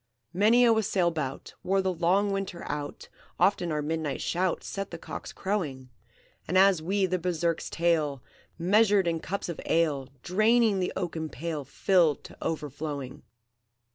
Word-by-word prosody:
"Many 220 +6 +5
a 230 - +6
wassail 195 -5 +1
bout 140 -5 -5
Wore 195 +1 +1
the 190 -1 0
long 185 +4 +2
Winter 195 -3 -3
out; 145 -1 -5 0.3
Often 190 -4 +2
our 150 -1 -1
midnight 155 -2 -2
shout 180 0 -1
Set 195 0 -5
the 170 - -7
cocks - - -7
crowing, 145 -11 -3 0.6
As 185 -1 +4
we 195 +4 +1
the 185 0 -1
Berserk's 170 -1 -1
tale 155 -6 0 0.3
Measured 200 +2 +4
in 165 -1 0
cups 200 +4 -4
of 170 - -5
ale, 150 -5 +1
Draining 215 +2 +3
the 180 - -1
oaken 165 -4 -3
pail 155 +2 -4
Filled 170 -5 +2
to - - -12
overflowing. 145 -2 -4
170 Hz, 145 wpm, -28 LUFS, 155-195 Hz, 0.6 s, a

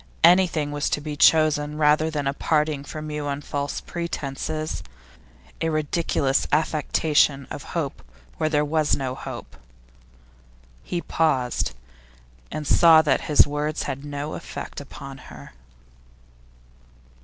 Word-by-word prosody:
Anything 170 -4 +4
was 145 0 -1
to - - 0
be 150 0 -5
chosen 150 -1 +4
rather 155 +1 +3
than 150 -3 -3
a 135 - 0
parting 150 -1 0
from 155 +1 -7
you 150 -1 -3
on 140 0 -2
false 145 -1 -3
pretences, 155 -2 -4 0.8
a 165 - +1
ridiculous 155 -3 0
affectation 150 -2 +2
of - - -5 0.2
hope 145 -5 -3 0.4
where 155 - 0
there 150 -1 +2
was 155 0 +1
no 130 -2 -3
hope.' 130 - -8 1.2
He 175 - -3
paused, 135 - 0 0.7
and 155 0 -5
saw 160 +1 +6
that 150 - +2
his 150 - +6
words 150 +1 -2
had 140 0 -5
no 145 +1 -5
effect 170 - -7
upon 135 -1 -10
her. 70 -3 -12
150 Hz, 125 wpm, -24 LUFS, 140-155 Hz, 1.2 s, saw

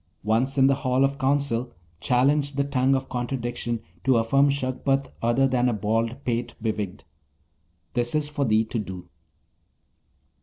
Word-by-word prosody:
Once 115 +6 +1
in 135 - +6
the 135 - +5
Hall 130 0 +2
of 140 +1 -2
Council, 135 -3 0 0.3
challenge 140 - +2
the 140 +1 +1
tongue 135 -1 +2
of 135 0 -2
contradiction 120 -2 -3 0.2
to 130 +1 +4
affirm 135 +5 +3
Shagpat 135 0 -1
other 120 +4 +3
than 125 -1 +2
a - - 0
bald 115 +5 -1
pate 120 -1 -2
bewigged. 105 -4 -3 0.9
This 120 +2 0
is 150 -1 +1
for 145 -1 -2
thee 110 -3 +2
to 115 +1 -3
do.' 95 -4 -7
125 Hz, 150 wpm, -25 LUFS, 115-135 Hz, 0.9 s, in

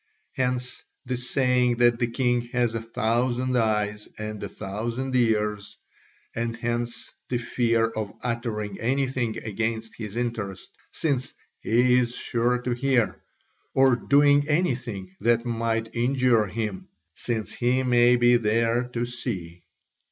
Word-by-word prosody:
Hence 125 -1 -2 0.2
the 130 0 -2
saying 125 0 +1
that 120 0 +3
the 120 - +1
king 120 0 +1
has 120 -2 +1
a 115 - -2
thousand 120 +3 0
eyes 105 -2 0
and 105 -1 -5
a - - -4
thousand 120 +7 -4
ears; 105 -4 0 0.6
and 115 0 -2
hence 120 0 -3 0.2
the 125 - 0
fear 115 -1 +1
of 110 -2 -4
uttering 115 -4 -3
anything 125 -2 0
against 110 +1 -3
his 105 -2 -7
interest 115 -5 -4 0.2
since 135 -5 -1 0.2
"he 125 +2 +3
is 120 -1 -1
sure 120 +1 0
to 125 - -1
hear," 120 -6 +1 0.5
or 130 -1 +5
doing 145 +3 +4
anything 120 - -1
that 115 0 +2
might 115 -1 -1
injure 120 -2 +3
him 105 -1 -4 0.3
"since 110 +1 -3
he 125 +2 +1
may 120 -1 +5
be 120 0 +5
there 115 +2 +1
to 120 -1 -3
see." 95 -9 -5
120 Hz, 130 wpm, -25 LUFS, 110-125 Hz, 0.6 s, or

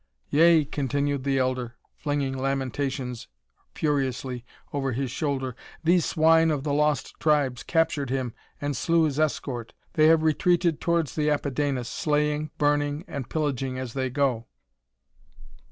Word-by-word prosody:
"Yea!" 160 0 +5
continued 140 0 -1
the 135 -1 +1
elder, 130 -2 -1 0.2
flinging 145 -3 -2
lamentations 135 -1 -2 0.5
furiously 130 -4 -1 0.3
over 135 -3 -1
his 130 0 -2
shoulder, 135 -4 -2 0.3
"these 170 +1 +4
swine 160 +1 +4
of 145 -3 -1
the 145 -1 -1
Lost 150 0 +1
Tribes 145 -5 +2
captured 155 -5 0
him 130 -3 -2 0.3
and 145 -1 -2
slew 165 +6 +2
his 150 -2 0
escort. 130 -6 -2 0.2
They 155 -1 +5
have 160 0 +5
retreated 170 +1 +2
towards 170 -4 +1
the 150 -1 +1
Apidanus, 140 -3 -1
slaying, 150 -3 0
burning 145 +2 +1
and 135 -4 -6
pillaging 135 -4 -1
as 130 -3 -5
they 130 -1 -1
go." 125 -4 0
145 Hz, 135 wpm, -26 LUFS, 130-155 Hz, 0.5 s, Yea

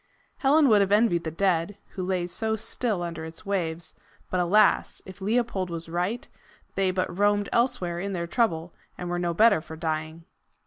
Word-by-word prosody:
Helen 290 +2 +4
would 210 -2 +6
have 195 0 +1
envied 205 -6 +3
the - - -1
dead, 180 +2 0
who 185 - -5
lay 180 -1 -1
so 220 +5 -1
still 220 -3 -2
under 165 -2 -5
its 160 +5 -9
waves; 170 -4 -2 0.4
but, 185 - +1
alas! 200 +4 +3
if 190 +1 -12
Leopold 210 -3 0
was 165 -1 -5
right, 180 +8 -2 0.5
they 195 -1 +1
but 185 -1 -2
roamed 205 +1 +2
elsewhere 180 -8 0
in 200 +2 -3
their 170 -2 -2
trouble, 170 -4 0 0.2
and 175 -1 -5
were 175 - -1
no 170 -1 -1
better 210 -3 +5
for 160 0 -9
dying. 160 0 -3
185 Hz, 180 wpm, -26 LUFS, 170-205 Hz, 0.5 s, would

